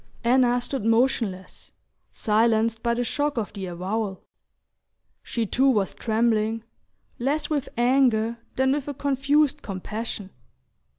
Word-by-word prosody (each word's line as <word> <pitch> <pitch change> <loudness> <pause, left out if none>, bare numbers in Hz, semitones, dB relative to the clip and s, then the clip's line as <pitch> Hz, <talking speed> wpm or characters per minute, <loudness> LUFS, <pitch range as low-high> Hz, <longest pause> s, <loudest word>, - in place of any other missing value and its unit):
Anna 245 0 +4
stood 255 -1 -4
motionless, 225 -5 0 0.4
silenced 225 +1 +1
by 235 -1 +1
the 245 - 0
shock 290 +3 -1
of 215 -3 -2
the 195 -2 -5
avowal. 190 +3 -3 1.0
She 230 -2 -2
too 265 +6 +3
was 210 -7 +1
trembling, 225 -1 0 0.6
less 290 +5 -1
with 290 -3 -1
anger 240 -2 +2 0.2
than 265 0 +2
with 285 0 -1
a 290 - -4
confused 285 +2 +1
compassion. 205 +1 -5
235 Hz, 120 wpm, -25 LUFS, 215-265 Hz, 1.0 s, Anna